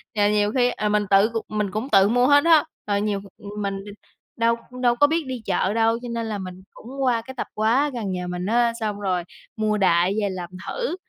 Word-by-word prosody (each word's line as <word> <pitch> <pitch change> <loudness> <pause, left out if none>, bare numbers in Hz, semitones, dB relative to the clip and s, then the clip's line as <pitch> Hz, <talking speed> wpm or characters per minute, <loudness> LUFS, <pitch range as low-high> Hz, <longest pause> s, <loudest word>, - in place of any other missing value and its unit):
Trời, 205 -1 +3
nhiều 210 0 +2
khi, 245 -1 +3
ờ, 215 -3 -2
mình 210 0 +1
tự 200 +2 +5
c - - -16 0.2
mình 210 -2 -1
cũng 215 +7 -3
tự 195 -3 +5
mua 245 +2 +3
hết 285 +1 +5
á. 325 -3 +6 0.2
Rồi 200 -1 +1
nhiều 205 -1 -1 0.4
mình 195 -1 -2 0.6
đâu 230 0 +2 0.3
đâu 240 -1 +3
có 290 +4 +5
biết 325 +2 0
đi 255 -2 -5
chợ 190 +1 0
đâu, 225 0 +2
cho 245 - -7
nên 230 -1 -3
là 215 -2 -3
mình 185 -1 -8
cũng 265 +4 -9
qua 240 -3 +2
cái 260 +3 -10
tập - - -3
hóa 235 +7 +2
gần 220 -6 -3
nhà 180 -1 -4
mình 180 0 -4
á, 235 +2 +2
xong 210 -2 -3
rồi 185 -3 -1 0.3
mua 215 -1 0
đại 180 -1 +3
về 205 - 0
làm 180 -2 -6 0.2
thử 485 -8 -3
215 Hz, 235 wpm, -23 LUFS, 200-240 Hz, 0.6 s, á